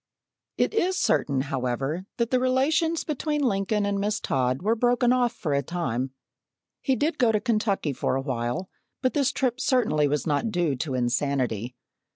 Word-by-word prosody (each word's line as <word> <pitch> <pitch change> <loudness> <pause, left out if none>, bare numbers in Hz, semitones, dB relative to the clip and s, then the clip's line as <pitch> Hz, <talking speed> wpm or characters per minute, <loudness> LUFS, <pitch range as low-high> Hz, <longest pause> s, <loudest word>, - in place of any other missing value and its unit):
It - - +1
is 375 -4 +1
certain, 140 - +1
however, 135 +6 -2
that 235 -1 0
the 255 - +3
relations 290 +6 +2
between 300 0 -1
Lincoln 205 -2 +1
and 200 0 0
Miss 205 +2 0
Todd 130 +3 0
were 215 +3 +3
broken 245 +1 +3
off 245 -2 +2
for 155 -9 -3
a 140 - +2
time. 135 -5 -2 0.7
He 265 - +1
did 305 +4 -1
go 240 -3 +4
to 215 - +2
Kentucky 210 - 0
for 130 - -1
a 135 - 0
while, 125 +5 -2 0.4
but 255 - +2
this 280 -3 +2
trip 255 -1 -1
certainly 205 - +2
was 145 -1 -1
not 150 +8 0
due 175 -8 0
to 140 -1 -3
insanity. 125 -2 -1
195 Hz, 175 wpm, -26 LUFS, -, 0.7 s, go